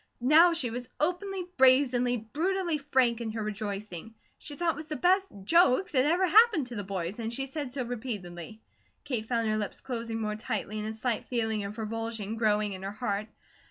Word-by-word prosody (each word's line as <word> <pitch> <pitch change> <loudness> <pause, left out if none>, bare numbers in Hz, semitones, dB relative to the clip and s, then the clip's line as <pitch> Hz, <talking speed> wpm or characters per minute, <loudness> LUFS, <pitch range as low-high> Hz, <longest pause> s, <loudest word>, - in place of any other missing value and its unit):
Now 310 +8 +6
she 265 -8 +2
was 245 +1 -6
openly, 360 +3 -1
brazenly, 255 -2 +4
brutally, 330 - -1
frank 260 -5 +2
in 230 - -3
her 220 -1 -3
rejoicing. 210 -1 -5 0.2
She 290 - -6
thought 335 +1 +1
it - - -12
was 310 +1 -8
the 310 - -4
best 375 +4 +2
"JOKE" 340 - +4
that 260 -2 +3
ever 345 +5 +3
happened 420 - +5
to 245 - -8
the 205 - -3
boys; 190 +1 -4
and 225 0 -3
she 270 +3 -3
said 275 -1 -5
so 260 0 -2
repeatedly. 220 -5 -6 0.4
Kate 245 -7 -3
found 230 -2 0
her 215 0 +1
lips 210 -2 -4
closing 230 -3 -4
more 210 -1 -2
tightly 215 -1 -3
and 210 - -3
a 220 - -3
slight 225 +1 -2
feeling 220 -3 -1
of 205 +2 -7
revulsion 225 -1 -4
growing 210 -2 +1
in 185 - -7
her 195 - -4
heart. 210 -1 -3
235 Hz, 195 wpm, -29 LUFS, 215-290 Hz, 0.4 s, Now